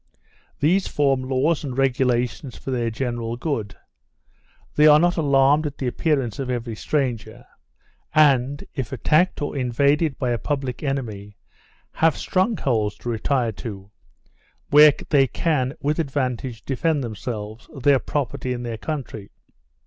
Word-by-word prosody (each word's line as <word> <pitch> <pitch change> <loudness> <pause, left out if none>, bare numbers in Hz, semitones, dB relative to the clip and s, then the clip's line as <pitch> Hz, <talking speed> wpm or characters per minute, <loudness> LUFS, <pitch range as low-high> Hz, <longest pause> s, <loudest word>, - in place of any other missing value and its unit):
These 180 +6 +2
form 135 -3 +1
laws 135 +5 0
and 130 -3 -5
regulations 125 -1 0
for 135 - -6
their 120 -2 0
general 120 0 -3
good; 115 - -3 1.0
they 150 +1 +5
are 150 0 +8
not 175 +2 +2
alarmed 145 0 +3
at 145 - -8
the 135 - -4
appearance 135 -3 -1
of 135 -2 -3
every 120 -2 -3
stranger; 125 -3 -3 0.7
and, 140 -2 +3
if 130 -6 -4
attacked 150 +6 +1
or 145 - -3
invaded 140 +4 +1
by 125 -3 -1
a 120 - -1
public 135 -3 -3
enemy, 110 -8 -4 0.5
have 160 -1 +2
strong 190 +4 0
holds 110 -6 0
to 120 - -6
retire 120 +1 0
to, 100 -2 -8 0.8
where 150 0 +8 0.2
they 140 -3 +4
can 140 -3 -1
with 150 +3 0
advantage 130 -5 -2
defend 145 +2 0
themselves, 110 -1 -6
their 140 -1 +3
property, 130 -2 -3
and 120 0 -5
their 115 -2 -5
country. 125 -7 -5
135 Hz, 140 wpm, -23 LUFS, 120-145 Hz, 1.0 s, are